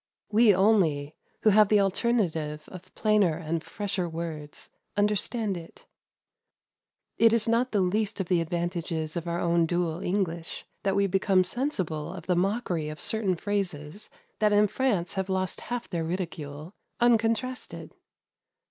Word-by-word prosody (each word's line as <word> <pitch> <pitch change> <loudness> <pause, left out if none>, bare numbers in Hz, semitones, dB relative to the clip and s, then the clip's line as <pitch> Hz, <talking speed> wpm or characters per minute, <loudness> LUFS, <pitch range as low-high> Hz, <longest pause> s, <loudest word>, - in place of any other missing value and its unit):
We 220 0 +6
only, 180 -8 +2 0.3
who 215 - +6
have 210 0 +5
the 210 - +5
alternative 180 -8 0
of 185 0 -11
plainer 210 -7 +2
and 165 0 -3
fresher 195 -4 -3
words, 160 -3 -6 0.3
understand 210 +1 +1
it. 165 -1 -11 1.3
It 230 -1 +6
is 230 -1 +2
not 235 +3 +2
the 205 - +2
least 205 +3 0
of 190 - -2
the 175 -2 +2
advantages 170 -1 -2
of 170 0 -4
our 170 0 -1
own 170 -1 +2
dual 175 -1 -1
English 175 -3 -2 0.2
that 195 -1 0
we 200 0 +3
become 195 0 +3
sensible 185 - -2
of - - -9
the 180 - +1
mockery 180 -4 0
of 155 0 -7
certain 210 -4 +1
phrases 190 -2 -3 0.3
that 210 -1 +3
in 205 0 +5
France 210 -6 0
have 190 -1 -3
lost 185 -1 -1
half 245 -1 -3
their 170 -3 -2
ridicule, 160 -2 -5 0.3
uncontrasted. 240 +2 0
185 Hz, 145 wpm, -27 LUFS, 165-210 Hz, 1.3 s, We